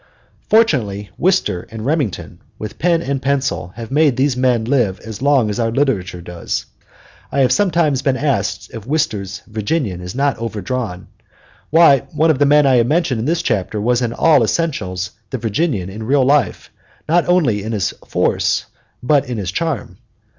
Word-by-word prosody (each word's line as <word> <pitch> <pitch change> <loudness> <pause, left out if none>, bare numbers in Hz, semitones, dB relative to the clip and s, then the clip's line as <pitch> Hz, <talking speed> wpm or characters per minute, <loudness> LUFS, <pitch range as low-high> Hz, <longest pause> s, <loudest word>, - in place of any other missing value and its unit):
Fortunately, 115 - +2
Wister 175 - 0
and 110 0 -7
Remington, 140 - -2 0.2
with 105 -1 -7
pen 170 0 +2
and 135 -2 -2
pencil, 135 -9 -1
have 115 +1 -8
made 145 -3 +3
these 135 -1 +2
men 125 -3 +1
live 120 -7 +1
as 110 +1 -8
long 140 -4 +3
as 105 +1 -3
our 115 -1 +1
literature 110 -9 -1
lives. 90 -1 -4 0.7
I 140 - +1
have 130 - +3
sometimes 170 -9 +2
been 135 -1 +1
asked 140 -2 -1
if 115 -1 -8
Wister's 105 -10 -2
"Virginian" 110 - -2
is 90 +3 -7
not 140 -2 0
overdrawn; 115 -3 -4 0.6
why, 160 -4 +6 0.2
one 160 +2 +4
of 140 - -1
the 145 - +4
men 150 0 +5
I 130 -2 +4
have 120 0 +3
mentioned 150 -5 +1
in 110 - -2
this 165 +3 0
chapter 105 +1 -1
was 120 +3 +1
in 120 -2 -1
all 140 +1 +4
essentials 100 - -2 0.2
the 130 - -3
Virginian 115 - -1
in 105 +3 -8
real 130 +4 +2
life, 145 +2 +1 0.4
not 170 +2 +2
only 145 - +2
in 110 +3 -5
his 105 -5 -1 0.2
force - - 0 0.4
but 140 0 +2
in 120 - -3
his 95 -3 -3
charm. 135 - -3
130 Hz, 175 wpm, -18 LUFS, 105-145 Hz, 0.7 s, why